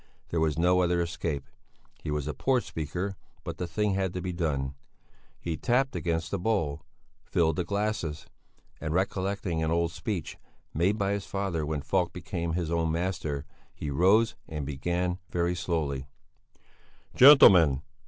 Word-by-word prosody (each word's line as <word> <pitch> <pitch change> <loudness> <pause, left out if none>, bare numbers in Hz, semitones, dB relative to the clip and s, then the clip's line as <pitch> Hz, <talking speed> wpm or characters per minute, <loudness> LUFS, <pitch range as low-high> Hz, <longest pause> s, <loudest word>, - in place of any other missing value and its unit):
There 85 - 0
was 80 -2 +1
no 90 +2 +4
other 90 -1 +2
escape. 85 -4 -2 0.5
He - - -5
was 75 -1 -2
a 75 - -2
poor 130 - +2
speaker, 90 +1 -4 0.3
but - - -6
the 90 - -2
thing 105 +4 0
had 95 -2 -1
to 90 - -2
be 90 -1 -3
done. 70 -6 -1 0.7
He 85 -2 -3
tapped 125 - +1
against 85 -1 -1
the 100 - -1
bowl, 90 -8 0 0.4
filled 80 -1 +1
the 90 - +1
glasses, 95 -5 -2 0.5
and 80 0 -3
recollecting 95 -2 -1
an 80 - 0
old 85 0 +1
speech, 95 -4 -4 0.3
made 95 +7 +2
by 100 -2 0
his 100 -1 -3
father 95 -6 -2
when 75 -2 -2
Falk 90 -3 0
became 85 -1 -3
his 85 -2 -2
own 85 -1 +1
master, 80 -4 -2 0.3
he 75 - -4
rose 100 +9 +4
and 75 -3 -4
began, 90 +6 -2
very 85 0 0
slowly: 75 -7 -2 1.1
"Gentlemen! 90 - +8
85 Hz, 155 wpm, -28 LUFS, 80-95 Hz, 1.1 s, Gentlemen